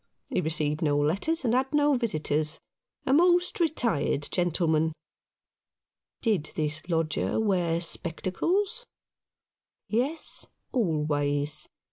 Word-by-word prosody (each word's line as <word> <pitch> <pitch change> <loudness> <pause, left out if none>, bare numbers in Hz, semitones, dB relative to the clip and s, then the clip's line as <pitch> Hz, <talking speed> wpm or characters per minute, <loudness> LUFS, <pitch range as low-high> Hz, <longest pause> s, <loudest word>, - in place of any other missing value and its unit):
He - - 0
received 155 0 -1
no 145 -3 +2
letters 195 - +1
and 230 - +2
had 265 +2 +1
no 295 0 +4
visitors 155 - 0 0.2
— - - -49
a 265 - +2
most 350 +4 +4
retired 235 - +1
gentle 175 -1 +1
man." 160 0 +2 1.3
Did 205 -10 0
this 155 +2 -2
lodger 165 +4 0
wear 180 -6 +1
spectacles? 355 - -1 1.0
Yes, 270 +9 -1 0.2
always. 150 - 0
175 Hz, 105 wpm, -28 LUFS, -, 1.3 s, no